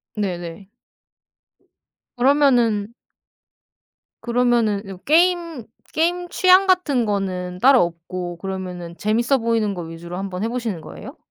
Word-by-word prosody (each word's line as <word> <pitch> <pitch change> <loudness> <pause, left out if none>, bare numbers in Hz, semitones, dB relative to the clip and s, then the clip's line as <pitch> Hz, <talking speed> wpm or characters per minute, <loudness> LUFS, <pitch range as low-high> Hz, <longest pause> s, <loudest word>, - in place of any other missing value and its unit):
네네. 180 -1 -5 1.5
그러면은 240 -5 +2 1.3
그러면은 235 -4 +1
이제 195 -1 -8
뭐 185 - -14
게임, 335 -5 +2 0.3
게임 350 +2 0
취향 375 +1 +5
같은 295 -10 +2
거는 185 -3 -3
따로 265 0 +6
없고 175 +1 -5
그러면은 180 -2 -6
재밌어 235 +6 +1
보이는 225 -3 0
거 175 - -6
위주로 170 +2 -8
한번 190 0 -4
해 - - 0
보시는 230 -9 -3
거예요? - - -10
215 Hz, 265 characters per minute, -21 LUFS, 180-265 Hz, 1.5 s, 따로